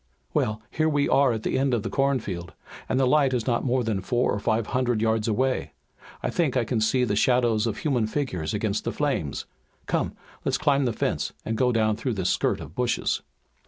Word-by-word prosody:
"Well, 110 0 0
here 160 0 +1
we 145 -2 +2
are 140 -2 +4
at 110 -2 -3
the - - 0
end 135 -2 +2
of 110 - -2
the - - -3
cornfield, 120 -11 -1 0.4
and 130 - +1
the 135 - +4
light 135 0 +3
is 120 - -1
not 120 -2 +1
more 130 -1 +1
than 110 -4 -1
four 120 +6 +1
or 105 - -1
five 110 +1 +1
hundred 125 -3 +1
yards 110 0 +1
away. 130 +4 0 0.5
I - - 0
think 150 -7 +1
I 120 - +2
can 115 -1 -1
see 125 +4 +2
the 105 -4 +1
shadows 120 -1 +3
of 110 - -2
human 125 -8 0
figures 110 - -2
against - - -1
the - - -1
flames. 75 -3 -2 0.4
Come, - - -1 0.3
let's - - +1
climb 140 -2 +2
the 120 - +1
fence - - -1
and 110 - -1
go 125 +2 +2
down 110 -2 +2
through 125 +1 -2
this 95 -3 0
skirt - - +1
of 75 - -9
bushes." 125 +3 0
120 Hz, 215 wpm, -26 LUFS, 110-130 Hz, 0.5 s, are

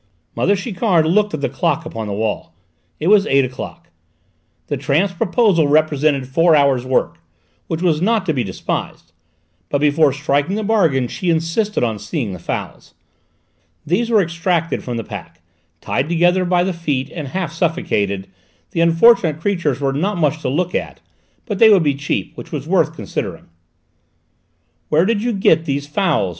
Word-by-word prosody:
Mother 200 - +2
Chiquard 190 -4 +1
looked 205 +3 +2
at 150 - -6
the - - +1
clock - - -1
upon 110 -1 -5
the 100 - -3
wall; 105 +1 -3 0.4
it 155 - -4
was 200 +1 +5
eight 135 -1 +3
o'clock. 130 0 -8 0.8
The - - -2
tramp's 180 +7 0
proposal 185 -4 +2
represented 150 -2 +2
four 165 +4 +3
hours' 135 -4 +2
work, 80 -11 0 0.5
which 165 +1 -3
was 160 -3 +2
not 215 0 +1
to 160 - 0
be 130 -4 -1
despised; 95 -3 -5 0.6
but - - +1
before 150 0 +3
striking 145 +5 0
the 215 - -2
bargain 165 - +2
she 180 +8 -3
insisted 165 - 0
on 110 -3 -1
seeing 105 - -4
the 90 - -8
fowls. - - -6 0.9
These 215 +9 0
were 215 -4 +4
extracted 170 0 -1
from 120 -2 -4
the 115 - -3
pack; - - -9 0.4
tied 135 +4 -1
together 175 +2 +2
by 175 0 +2
the 190 0 -1
feet, 145 -6 -2
and 155 -5 -6
half 170 +1 -3
suffocated, 160 - -1 0.4
the 165 - 0
unfortunate 165 -1 +4
creatures 170 -8 -1
were 135 -1 0
not 180 +8 -1
much 155 -1 0
to - - -2
look 175 +6 -1
at, - - -3 0.5
but 205 -5 -4
they 225 - +8
would 195 -5 +5
be 145 -2 +2
cheap, 140 -8 -3
which - - -10
was - - -4
worth - - +1
considering. - - -5 1.4
"Where 160 +3 +3
did 215 0 +1
you 240 +2 0
get 165 -6 +2
these 140 -1 -2
fowls?" 150 - 0
160 Hz, 170 wpm, -18 LUFS, 140-185 Hz, 1.4 s, they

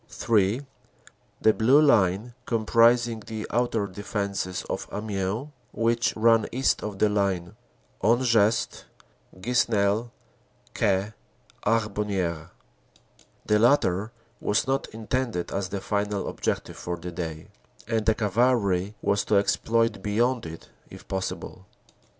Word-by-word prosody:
(3) 110 +4 +1 0.8
The 110 - +5
Blue 125 +7 +5
Line, 110 -5 +3
comprising 115 +1 +3
the 110 0 -6
outer 115 -3 +1
defenses 100 -1 -3
of - - -4
Amiens, 105 +5 -3 0.2
which 115 +1 +1
ran 115 0 +4
east 130 +2 +1
of 105 -2 -5
the 105 - +3
line 100 -4 -1 0.5
Hangest 115 -1 +2 0.6
Ques 120 0 +2
nel 105 +2 +1 0.6
Caix 100 -1 0 0.5
Harbonnieres. 100 -7 -1 1.0
The 105 0 +3
latter 110 -4 +3 0.3
was 105 - +1
not 135 +1 -1
intended 115 -4 -3
as 95 -1 -2
the 100 -1 -4
final 100 0 -1
objective - - -3
for 90 0 -4
the 90 +1 -7
day, 80 -2 -6 0.4
and 110 -1 0
the 110 - +4
Cavalry 105 -3 +1
was 100 0 +1
to 105 - +1
exploit 115 +3 +1
beyond 115 +1 0
it 80 0 -11 0.2
if - - -13
possible. 95 0 -5
105 Hz, 115 wpm, -26 LUFS, 100-115 Hz, 1.0 s, The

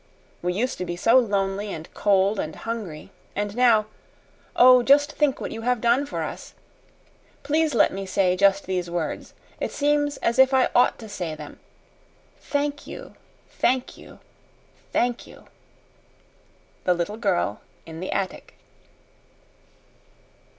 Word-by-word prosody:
We 180 +1 -1
used 250 +7 -2
to - - -2
be 175 - -4
so 230 +8 +5
lonely 200 -2 -1
and 160 -2 -7
cold 200 0 +2
and 155 - -4
hungry, 215 -10 -6 0.2
and 205 0 -3
now 235 -4 +4 0.7
oh, 250 0 +7
just 290 +4 +4
think 295 -3 0
what - - -5
you 225 - -6
have 250 +1 0
done 240 +5 +2
for - - -3
us! - - -8 0.9
Please 305 0 +1
let 215 - +4
me 195 0 -5
say 185 -1 +2
just 195 +1 +3
these 180 -2 -2
words. 170 -2 -4 0.2
It - - -3
seems 290 0 +1
as 235 +2 -1
if 265 0 +6
I 260 - +3
OUGHT 245 - +4
to 220 - -10
say 175 -6 -5
them. - - -11 0.8
THANK 290 0 -3
you - - -9 0.4
THANK 255 0 0
you - - -15 0.7
THANK 245 0 0
you! - - -15 1.4
THE 180 - +2
LITTLE 175 +5 -3
GIRL 190 - -1 0.2
IN 160 0 -9
THE 185 - -4
ATTIC. 190 -1 -4
215 Hz, 145 wpm, -24 LUFS, 185-255 Hz, 1.4 s, oh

